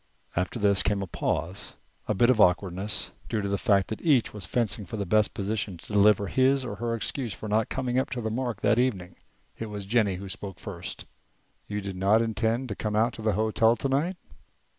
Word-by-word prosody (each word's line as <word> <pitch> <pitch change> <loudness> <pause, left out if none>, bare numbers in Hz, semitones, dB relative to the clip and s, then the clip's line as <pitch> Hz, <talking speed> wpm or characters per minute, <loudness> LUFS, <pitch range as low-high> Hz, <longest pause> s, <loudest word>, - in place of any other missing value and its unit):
After 90 +7 -1
this 100 -3 +3
came 100 -2 0
a - - -3
pause, 90 +1 -3 0.3
a 105 - 0
bit 120 +5 +5
of 110 -4 +3
awkwardness, 90 +2 +2 0.2
due 110 - 0
to 100 - -2
the 100 - 0
fact 100 -3 +3
that 110 - -5
each 140 -8 +3
was 100 -5 -7
fencing 115 -1 0
for 110 +3 -6
the 100 - -2
best 105 +2 +2
position 100 -2 -2
to 95 - -11
deliver 105 0 +5
his 130 +4 +2
or 100 - -5
her 115 +1 -1
excuse 115 0 -3
for 110 - -7
not 110 +1 +1
coming 130 -1 0
up 130 - -1
to 125 -2 -3
the 110 -1 -2
mark 120 -3 -3
that 115 - +3
evening. 95 -9 -1 0.4
It 115 - -4
was 105 -2 -6
Jennie 105 -2 +2
who 95 +2 -7
spoke 95 -2 -7
first. - - -6 0.6
"You 105 0 -3
did 95 -1 -6
not 100 +4 +4
intend 115 +3 0
to 105 - -3
come 105 -1 -3
out 115 +3 +2
to - - -8
the 110 -1 +1
hotel 110 +2 +3
tonight?" 140 +9 0
105 Hz, 215 wpm, -27 LUFS, 100-120 Hz, 0.6 s, bit